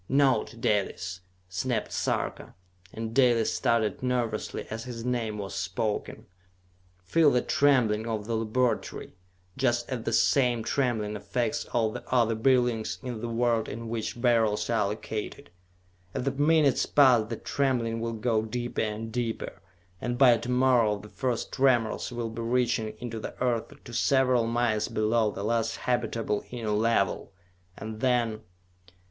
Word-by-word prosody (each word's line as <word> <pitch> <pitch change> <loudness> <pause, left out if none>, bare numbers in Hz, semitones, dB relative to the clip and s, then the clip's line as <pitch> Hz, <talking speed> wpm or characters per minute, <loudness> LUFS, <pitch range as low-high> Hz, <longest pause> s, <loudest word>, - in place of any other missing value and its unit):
"Note, 135 -5 +2
Dalis!" 95 -4 -1 0.3
snapped 105 +7 -2
Sarka, - - -2 0.4
and 115 0 -5
Dalis 120 -3 +3
started 115 -5 +1
nervously 120 -4 -2
as 115 +1 -5
his 120 -2 -6
name 115 -4 -1
was 100 -1 -5
spoken. 95 +3 -3 0.8
"Feel 155 - +4
the 125 -3 +2
trembling 125 -7 +2
of 110 -2 -3
the 115 - -3
laboratory, 115 +3 -1 0.4
just 120 -2 +1
as 130 -3 -3
the 115 - -2
same 120 0 +3
trembling 110 -7 0
affects 120 +8 -2
all 115 -2 0
the - - -7
other 120 -3 +3
buildings 120 -1 +1
in 120 -4 -5
the 120 - -3
world 115 -1 +1
in 115 +1 -6
which 115 +1 -4
Beryls 115 -3 +2
are 110 -3 +2
located. 110 +5 -5 0.6
As - - -1
the 135 - 0
minutes 145 0 +3
pass 125 -6 +5
the 115 - -3
trembling 120 -5 -1
will 115 0 -2
go 110 0 0
deeper 120 +2 -3
and 110 +1 -3
deeper, 115 -4 -3 0.4
and 120 0 -2
by 125 -3 +7
to 120 - -6
morrow 125 -4 +3
the 105 +1 -12
first 125 -1 -2
tremors 125 -5 +2
will 120 -2 -4
be 115 +1 -6
reaching 115 -2 0
into 115 -2 -5
the - - -8
Earth 120 -3 0
to 120 - -11
several 125 -1 +3
miles 115 -2 +1
below 110 0 +1
the 100 - -6
last 115 +1 0
habitable 115 -4 -1
Inner 115 -3 -3
Level! 105 -3 +1 0.5
And 110 0 -7
then.... 120 -3 +1
115 Hz, 150 wpm, -28 LUFS, 110-125 Hz, 0.8 s, by